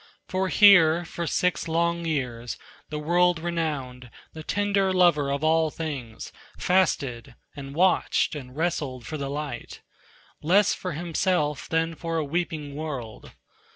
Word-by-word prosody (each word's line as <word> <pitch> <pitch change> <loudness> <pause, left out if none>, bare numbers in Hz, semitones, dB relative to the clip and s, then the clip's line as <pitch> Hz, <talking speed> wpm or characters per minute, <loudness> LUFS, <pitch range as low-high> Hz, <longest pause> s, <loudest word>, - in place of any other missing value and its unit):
For 190 +1 -1
here, 175 -5 +6
for 170 0 -5
six 180 +5 0
long 170 +1 0
years, 125 -7 -3 0.3
the 150 - -4
world 175 +3 +2
renowned, 150 -7 -3 0.2
The 160 - -8
tender 200 +2 +1
lover 175 -6 +3
of 140 +2 -2
all 160 +1 +3
living 155 - -6 0.4
things, - - -9 0.2
Fasted 140 -11 0 0.2
and 140 0 -8
watched 185 +2 +2
and 130 -4 -8
wrestled 150 -7 -2
for 155 - -5
the 140 -1 -3
light, 145 -4 -6 0.6
Less 195 +6 +4
for 180 -2 -5
himself 165 -2 -1
than 165 0 0
for 165 0 -4
a 155 - 0
weeping 155 -2 -3
world. 140 -7 -6
160 Hz, 140 wpm, -25 LUFS, 140-175 Hz, 0.6 s, here